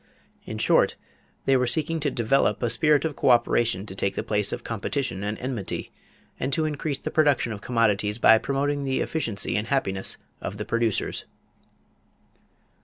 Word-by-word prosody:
In - - -5
short, - - +3 0.5
they 135 - +4
were 125 -1 +2
seeking 160 +5 0
to 145 -1 0
develop 130 +1 +1
a 120 - +2
spirit 150 -1 +3
of 155 -3 -2
coöperation 120 -5 +2
to 95 - -6
take 100 0 -1
the - - -2
place 105 -2 +1
of - - -5
competition 115 -2 -3
and 105 +1 -2
enmity; 125 -7 -4 0.5
and 135 - -1
to 160 -1 +2
increase 150 -1 -2
the - - -5
production 145 -7 +2
of 100 - -8
commodities 105 -3 +1
by 110 -1 +6
promoting 140 +3 -1
the 135 -1 0
efficiency 115 -11 -2
and 110 +2 -1
happiness 95 -9 0 0.2
of 100 - -5
the 105 - -4
producers. 115 -3 -1
120 Hz, 165 wpm, -25 LUFS, 105-140 Hz, 0.5 s, by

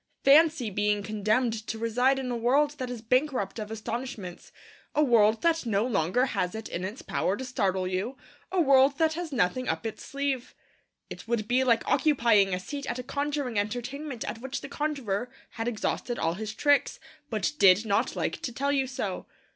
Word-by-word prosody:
Fancy 290 -4 +5
being 205 +1 0
condemned 215 +3 +1
to 225 - -3
reside 245 +4 +2
in 260 -2 -3
a - - -1
world 270 +6 +2
that 255 -1 -3
is 240 -3 -6
bankrupt 255 -3 0
of 210 -1 -5
astonishments, 220 -4 -6 0.4
a 300 - +4
world 225 -4 +4
that 330 -1 +2
no 220 -2 +1
longer 200 +1 +1
has 180 -7 -2
it 220 0 -6
in 175 - -4
its 205 +7 -6
power 195 - -1
to 260 - -5
startle 190 -7 0
you, 190 +8 -3 0.3
a 375 - +1
world 275 -2 +5
that 320 -1 +2
has 340 -1 -5
nothing 250 +1 0
up - - -2
its 220 - -5
sleeve! 275 -3 -3 0.6
It - - -9
would 225 -2 -1
be 250 +2 +3
like 235 -3 +2
occupying 230 -10 +3
a 180 - -1
seat 280 +9 -6
at 240 - -2
a 250 - -5
conjuring 280 -4 -2
entertainment 245 +5 -4
at 225 - -5
which 265 +1 -4
the - - -8
conjurer 260 -8 -2 0.2
had 225 0 -4
exhausted 240 +1 -2
all 165 - 0
his 215 +3 -6
tricks, 290 -1 +2 0.3
but 215 -3 0
did 195 +3 +6
not 200 -2 +1
like - - -2
to 245 - -3
tell 280 +4 -1
you 270 -2 +1
so! 210 -7 -4
240 Hz, 190 wpm, -28 LUFS, 210-275 Hz, 0.6 s, did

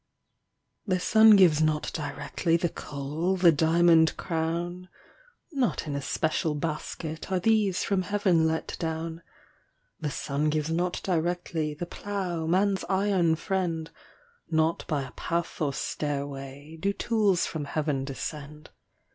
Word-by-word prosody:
The 185 -2 +1
sun 220 +3 +7
gives 170 -6 +5
not 155 -1 +1
directly 160 +3 -1
The 170 0 0
coal, 150 +8 -3
the 175 -2 +6
diamond 160 +1 +4
crown; 175 +2 -3 0.6
Not 265 - 0
in 150 - -4
a 140 - -2
special 155 +2 0
basket 155 +2 -4
Are 185 - +2
these 210 -2 +2
from 195 -2 +1
Heaven 185 -4 +2
let 160 0 -2
down. 165 0 -3 0.8
The 150 - -2
sun 145 +2 -1
gives 155 +1 -1
not 175 +2 -1
directly 170 -3 -1
The 175 - -4
plough, 180 -3 -4
man's 190 +2 +2
iron 190 -4 +2
friend; 170 -3 -2 0.6
Not 160 0 +1
by 150 -4 -1
a 130 - -9
path 170 +4 -3
or 145 -2 +1
stairway 140 +1 -4
Do 200 +4 0
tools 205 -5 +1
from 155 -3 -4
Heaven 145 -2 -1
descend. 150 +2 -7
165 Hz, 130 wpm, -27 LUFS, 150-180 Hz, 0.8 s, sun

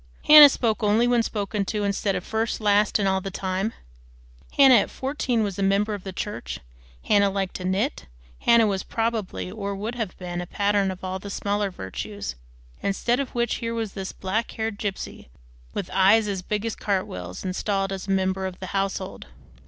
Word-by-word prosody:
Hannah 300 -1 +11
spoke 230 -4 0
only 215 +3 +3
when 245 -1 +3
spoken 205 -2 -2
to, 210 +2 -2
instead 200 0 0
of 180 - -3
first, 220 +2 -2
last, 210 -1 +3
and 200 -2 +1
all 190 0 +1
the 195 - -4
time; 190 +2 -2 0.9
Hannah 270 -2 +8
at 205 - +1
fourteen 260 -4 -1
was 200 -2 -3
a - - 0
member 200 +2 +2
of 200 -3 -6
the 190 - -5
church; 185 - -5 0.4
Hannah 200 -1 +4
liked 195 -1 -2
to 185 - -6
knit; 195 - -1 0.3
Hannah 235 -1 +5
was, 195 -2 0
probably, 225 -5 -2
or 200 -1 -4
would 215 +4 -4
have 225 -7 -4
been, 175 -1 -4
a 175 - -6
pattern 200 0 +1
of 185 0 -7
all 185 0 -3
the 200 - -8
smaller 205 0 -1
virtues; 100 - -6 0.5
instead 235 +5 0
of 275 -3 -4
which 240 -1 0
here 230 0 -3
was 225 -3 -3
this 195 -1 -5
black 210 +5 -2
haired 220 -2 -3
gypsy, 200 - -5 0.5
with 175 - -4
eyes 200 +3 +5
as 195 -2 -2
big 210 +3 -2
as 225 - -2
cartwheels, 90 - -3
installed 195 +1 -1
as 195 0 -5
a - - -1
member 190 0 0
of 185 -1 -7
the 185 - -6
household. 195 0 -2
200 Hz, 190 wpm, -25 LUFS, 190-220 Hz, 0.9 s, Hannah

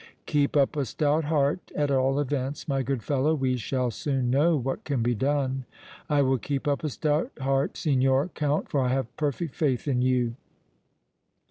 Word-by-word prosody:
"Keep 145 0 +1
up 140 +2 +3
a 145 - 0
stout 150 +5 0
heart, 150 +2 0
at 145 -1 +1
all 135 +1 +2
events, 140 0 -2
my 135 -2 0
good 130 -3 -2
fellow. 145 +2 +1
We 130 -3 0
shall 125 +1 -1
soon 130 0 -1
know 155 +5 +3
what 135 0 -3
can 135 -6 -1
be 120 +1 +2
done." 135 +1 0 0.4
"I 145 -2 +3
will 130 -1 +2
keep 140 +2 -3
up 140 0 0
a 155 - 0
stout 155 - 0
heart, 135 +1 0
Signor 135 +1 +2
Count, 150 -3 -1
for 140 - 0
I 130 - +1
have 130 -2 -2
perfect 150 0 -2
faith 140 -3 0
in 125 -3 +1
you!" 125 -2 +1
140 Hz, 185 wpm, -26 LUFS, 130-145 Hz, 0.4 s, up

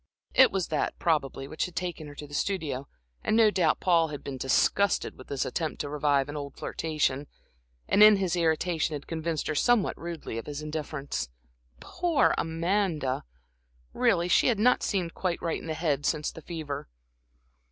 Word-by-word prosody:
It 260 - +7
was 190 -2 -1
that, 155 -3 -1
probably, 135 -4 0
which 155 - -2
had 180 - -9
taken 175 -4 -4
her 145 - -10
to 150 - -7
the 145 - -14
studio, 145 -7 -2 0.4
and 215 - +2
no 220 -2 +6
doubt 170 -6 +2
Paul 170 -3 +3
had 150 -2 -7
been 135 -2 -5
disgusted 200 +9 +2
with 130 - -13
this 140 -2 -2
attempt 160 -3 -3
to 145 - -4
revive 145 -2 +1
an 145 - -6
old 140 -2 -6
flirtation, 150 -3 -1 0.6
and 205 - +3
in 210 0 +10
his 190 -3 0
irritation, 165 -1 +1
had 145 - -7
convinced 160 -1 -3
her 155 - -1
somewhat 235 +7 +2
rudely 165 -9 -5
of - - -9
his 150 0 -5
indifference. 150 - -4 0.5
Poor 345 -4 +1
Amanda! 165 - -1 0.7
Really 170 +1 +2
she 180 - +4
had 240 -4 +3
not 245 +4 +4
seemed 180 -5 -1
quite 180 -3 -2
right 165 - -2
in - - -9
the 160 - -2
head 150 -3 0
since 150 -2 0
the 165 - -11
fever. 155 - -5
160 Hz, 180 wpm, -28 LUFS, 145-180 Hz, 0.7 s, in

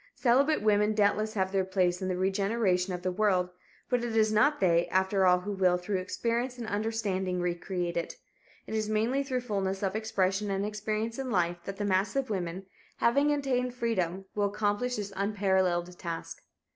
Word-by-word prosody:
Celibate 270 +2 +3
women 210 0 +3
doubtless 215 +1 +1
have 190 -2 0
their 195 -1 +1
place 185 -1 0
in 185 - -2
the 185 -1 -1
regeneration 195 0 +1
of 180 0 -5
the 185 - 0
world, 180 -2 +1 0.4
but 245 -2 0
it 235 -2 -3
is 215 0 +3
not 285 +8 +3
they, 170 -2 +3
after 190 0 +2
all, 180 0 +4
who 205 +3 -4
will, 185 -2 +2
through 185 +2 -2
experience 235 +6 -2
and 235 - -5
understanding 205 -4 -1
recreate 175 0 -2
it. 170 - -3 0.5
It - - -7
is 215 -1 -1
mainly 225 +6 +1
through 260 -2 -2
fullness 195 -4 -2
of 195 0 -1
expression 205 -2 0
and 195 0 -1
experience 215 +3 -3
in 265 -1 -3
life 175 -5 +1
that 195 0 -5
the 205 - -2
mass 195 +3 +1
of 270 -3 -1
women, 185 -1 -3 0.3
having 280 +5 +3
attained 255 -4 0
freedom, 195 -6 -1
will 205 -1 +1
accomplish 210 +4 0
this 205 -2 -5
unparalleled 190 -3 0
task. 170 -2 -6
200 Hz, 185 wpm, -29 LUFS, 185-220 Hz, 0.5 s, all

